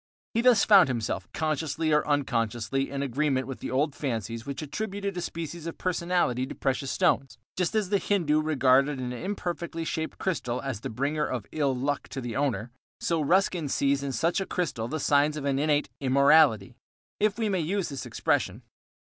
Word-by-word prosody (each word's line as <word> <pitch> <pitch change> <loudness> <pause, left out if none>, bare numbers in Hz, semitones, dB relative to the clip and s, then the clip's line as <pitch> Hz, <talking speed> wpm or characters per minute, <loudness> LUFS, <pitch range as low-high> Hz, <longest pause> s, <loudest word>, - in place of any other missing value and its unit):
He 230 - +2
thus 240 -4 +5
found 195 -5 +7
himself, 120 -4 -2
consciously 155 0 -1
or 150 - +2
unconsciously, 125 -2 0
in 140 0 -3
agreement 135 0 0
with 135 -1 -7
the - - -5
old 140 +3 +1
fancies 115 -4 -4
which 140 +1 -4
attributed 200 +4 -4
a 175 - -3
species 165 0 -5
of 165 - -6
personality 170 -8 0
to - - -7
precious 135 0 -1
stones. 130 -2 +1 0.2
Just 180 +3 -1
as 210 -4 +1
the 200 -1 +2
Hindu 160 -8 +1
regarded 140 -2 +3
an 125 -1 -3
imperfectly 170 +1 -4
shaped 160 0 -3
crystal 125 -10 -2
as 130 -6 -5
a - - -3
bringer 145 +6 -1
of 120 -6 -3
ill 140 -4 0
luck 140 +3 -2
to 135 - -5
the 120 -3 -5
owner, 130 -4 -1 0.3
so 165 -2 0
Ruskin 175 -1 +2
sees 140 +1 +1
in 140 -1 -3
such 165 - 0
a 195 - -3
crystal 145 - -2
the 155 +5 -3
signs 145 +1 +2
of 145 - -4
an 135 -1 +1
innate 150 0 +2
"immorality," 140 -5 +4 0.5
if 210 0 +2
we 225 -2 0
may 190 -3 0
use 180 +3 -1
this 140 -2 -6
expression. - - -1
145 Hz, 185 wpm, -27 LUFS, 130-170 Hz, 0.5 s, found